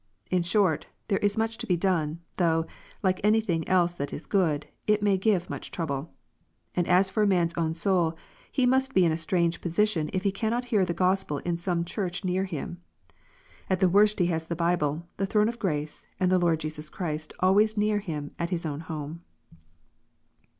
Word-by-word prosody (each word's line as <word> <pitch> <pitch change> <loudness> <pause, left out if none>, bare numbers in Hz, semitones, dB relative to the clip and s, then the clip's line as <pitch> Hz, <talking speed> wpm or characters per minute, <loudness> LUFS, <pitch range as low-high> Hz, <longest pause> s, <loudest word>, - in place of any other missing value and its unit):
In 180 -1 +3
short, 170 -2 +2 0.2
there 195 - +2
is 205 +1 +1
much 225 0 -1
to - - -4
be 180 - +2
done, 165 -3 0 0.2
though, 165 -2 +2 0.4
like 185 -1 +1
anything 210 -6 +2
else 175 -2 +3
that 145 -4 -4
is 155 - -6
good, 160 -7 +1 0.2
it 210 -1 +3
may 200 -2 +4
give 190 -2 +1
much - - -6
trouble. 150 -2 -3 0.6
And 175 -1 0
as 185 +2 +4
for 215 - 0
a 210 - +4
man 180 -3 +3
s 170 - -3
own 160 -1 -1
soul, 170 -2 +1 0.3
he 260 - +2
must 265 +1 +2
be 185 - +6
in 165 - +3
a - - +1
strange 170 +1 0
position 170 -2 +1
if 185 - -2
he 200 - +2
cannot 225 +5 -1
hear 205 -3 +4
the 170 -1 -3
Gospel 185 -3 +1
in 170 -1 -1
some 170 -1 -1
Church 180 0 -3
near 185 +1 +1
him. 175 0 -6 0.9
At 185 -1 +1
the 185 - +4
worst 210 +3 +4
he 180 - +3
has 160 -2 -1
the 170 - -2
Bible, 170 -2 0
the 195 - 0
throne 210 +1 +3
of 235 +1 -4
grace, 150 -5 -2
and 185 -1 +2
the 185 - +4
Lord 165 -2 +2
Jesus 155 0 -5
Christ 155 -4 -4
always 210 +4 +4
near 210 0 +2
him 155 -7 -5
at 170 0 -1
his 175 -2 -2
own 145 -2 -3
home. 160 0 -6
180 Hz, 200 wpm, -27 LUFS, 165-195 Hz, 0.9 s, be